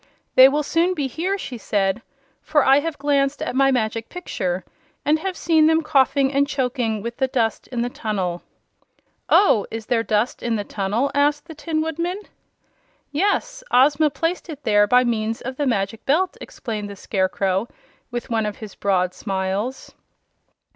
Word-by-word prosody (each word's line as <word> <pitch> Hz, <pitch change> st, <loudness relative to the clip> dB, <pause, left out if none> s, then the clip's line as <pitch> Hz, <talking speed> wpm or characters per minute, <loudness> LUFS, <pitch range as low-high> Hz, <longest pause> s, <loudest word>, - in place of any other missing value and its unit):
"They 260 Hz, +1 st, +9 dB
will 295 Hz, +2 st, 0 dB
soon 345 Hz, +5 st, +1 dB
be 290 Hz, -4 st, -1 dB
here," 345 Hz, +10 st, -2 dB
she 250 Hz, -10 st, -7 dB
said, 200 Hz, 0 st, 0 dB, 0.4 s
"for 300 Hz, -2 st, +2 dB
I 270 Hz, +1 st, +6 dB
have 325 Hz, +2 st, -3 dB
just -, -, -27 dB
glanced 280 Hz, 0 st, +1 dB
at -, -, -3 dB
my 270 Hz, 0 st, +4 dB
Magic 225 Hz, -2 st, -1 dB
Picture, 185 Hz, -, -3 dB, 0.4 s
and 305 Hz, +2 st, +3 dB
have 370 Hz, +1 st, -4 dB
seen 320 Hz, -2 st, +4 dB
them 320 Hz, 0 st, +3 dB
coughing 275 Hz, -1 st, +2 dB
and 280 Hz, +1 st, +2 dB
choking 250 Hz, -6 st, -1 dB
with 235 Hz, +1 st, -5 dB
the 265 Hz, -, +1 dB
dust 230 Hz, -4 st, -1 dB
in 240 Hz, -2 st, -2 dB
the -, -, -1 dB
tunnel." 190 Hz, -7 st, -3 dB, 0.9 s
"Oh, 225 Hz, -, +4 dB
is 225 Hz, -1 st, -6 dB
there 235 Hz, -1 st, +1 dB
dust 220 Hz, +2 st, 0 dB
in 235 Hz, -1 st, -1 dB
the 205 Hz, -, -2 dB
tunnel?" 205 Hz, +7 st, -1 dB
asked 290 Hz, +1 st, +2 dB
the 330 Hz, -, -9 dB
Tin 310 Hz, +1 st, -2 dB
Woodman. 335 Hz, +4 st, -2 dB, 0.9 s
"Yes; 405 Hz, +10 st, 0 dB
Ozma 290 Hz, +4 st, +4 dB
placed 335 Hz, +4 st, -3 dB
it 295 Hz, -2 st, -8 dB
there 205 Hz, -1 st, +4 dB
by 250 Hz, +3 st, +5 dB
means 225 Hz, -2 st, -1 dB
of 260 Hz, +1 st, -6 dB
the 290 Hz, -, 0 dB
Magic 205 Hz, -2 st, -1 dB
Belt," 355 Hz, +7 st, +2 dB
explained 215 Hz, -4 st, -6 dB
the 200 Hz, -, -8 dB
Scarecrow, 190 Hz, +1 st, -1 dB, 0.4 s
with 240 Hz, -1 st, -5 dB
one 220 Hz, -2 st, +1 dB
of 210 Hz, -, -5 dB
his 215 Hz, -3 st, -9 dB
broad 185 Hz, -2 st, 0 dB
smiles. 195 Hz, +6 st, -3 dB
255 Hz, 175 wpm, -22 LUFS, 215-295 Hz, 0.9 s, They